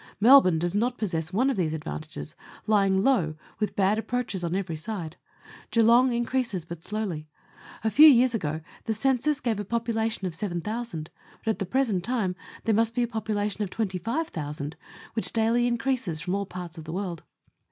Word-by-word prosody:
Melbourne 225 -6 +7
does 175 +2 -1
not 240 +4 0
possess 165 -6 -2
one 255 +8 +2
of 260 - -3
these 160 -4 0
advantages, 155 0 -6 0.3
lying 195 -3 +3
low, 185 -13 +2 0.2
with 210 - -1
bad 200 +2 +2
approaches 225 -4 -3
on 170 +1 -1
every 190 -4 -2
side. 165 -1 -5 0.5
Geelong 235 +3 +5
increases 240 -6 -1
but 170 -1 -8
slowly. 190 -7 -4 0.6
A 220 - +1
few 300 +9 +9
years 255 -3 +6
ago 155 -7 -2 0.2
the 220 - -1
census 270 +5 +2
gave 230 -4 -1
a - - -2
popula 225 +1 0
tion 195 - -3
of 180 - -2
seven 175 0 -2
thousand, 210 -5 -5 0.3
but 225 - +3
at - - -5
the 195 - -2
present 225 -6 +1
time 215 -5 -1 0.3
there 225 - +2
must 225 +2 +2
be 245 - +2
a - - 0
population 215 -3 -2
of 200 - -4
twenty 190 -3 -2
five 310 - -2
thousand, 150 -1 -5 0.4
which 225 - 0
daily 230 +2 +3
increases 235 -8 -1
from 180 +3 -3
all 200 0 -1
parts 180 -3 -7
of 155 - -9
the 160 - -6
world. 180 -4 -3
210 Hz, 190 wpm, -27 LUFS, 175-235 Hz, 0.6 s, few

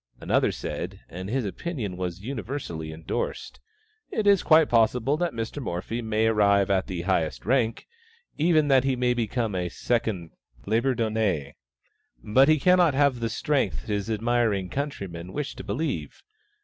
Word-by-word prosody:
Another - - +2
said - - -5
and 95 +3 -6
his 130 0 -1
opinion 105 - -4
was 90 0 -4
universally 120 - -5
endorsed 80 +1 -4 0.5
"It 215 - -2
is 200 -2 +5
quite 155 -1 +5
possible 120 +4 +2
that 175 0 0
Mr. 115 +4 -4
Morphy 115 +3 -3
may 110 -1 0
arrive 100 -3 +3
at 95 -1 +1
the 90 -2 -4
highest 85 -4 -1
rank, 115 -1 +1 0.5
nay, 155 - +1
even 155 -4 +4
that 135 -2 +5
he 135 -1 +1
may 125 0 +1
become 115 -2 -1
a 90 -1 -2
second 105 -6 -2 0.3
Labourdonnais, 110 - 0 0.7
but 130 +7 +4
he 155 - +5
cannot 180 -2 +4
have 140 -3 +3
the 115 -1 -1
strength 145 +5 -1
his 105 0 -2
admiring 110 -4 +1
countrymen 95 - -5
wish 150 +3 -3
to - - -8
believe. 160 +4 -3
115 Hz, 150 wpm, -26 LUFS, 95-135 Hz, 0.7 s, is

